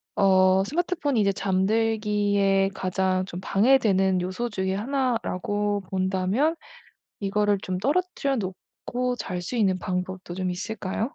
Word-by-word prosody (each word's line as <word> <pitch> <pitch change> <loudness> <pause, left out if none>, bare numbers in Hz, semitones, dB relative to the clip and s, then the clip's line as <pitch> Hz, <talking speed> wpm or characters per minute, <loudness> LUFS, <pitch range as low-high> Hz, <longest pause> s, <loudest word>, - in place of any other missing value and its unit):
어 190 -1 +4
스마트폰이 305 - -1
이제 200 -1 +3
잠들기에 205 0 +1
가장 185 0 0
좀 180 -1 -7
방해되는 195 -5 +3
요소 190 +7 -2
중에 190 -2 -2
하나라고 210 -4 -1
본다면 190 - +1 0.6
이거를 205 0 +1
좀 185 -1 -3
떨어뜨려 280 - 0
놓고 190 -3 -3 0.6
잘 180 -1 -4
수 180 +8 -5
있는 190 -5 +2
방법도 185 0 -4
좀 185 -1 -2
있을까요? 190 +1 -4
195 Hz, 280 characters per minute, -25 LUFS, 185-225 Hz, 0.6 s, 어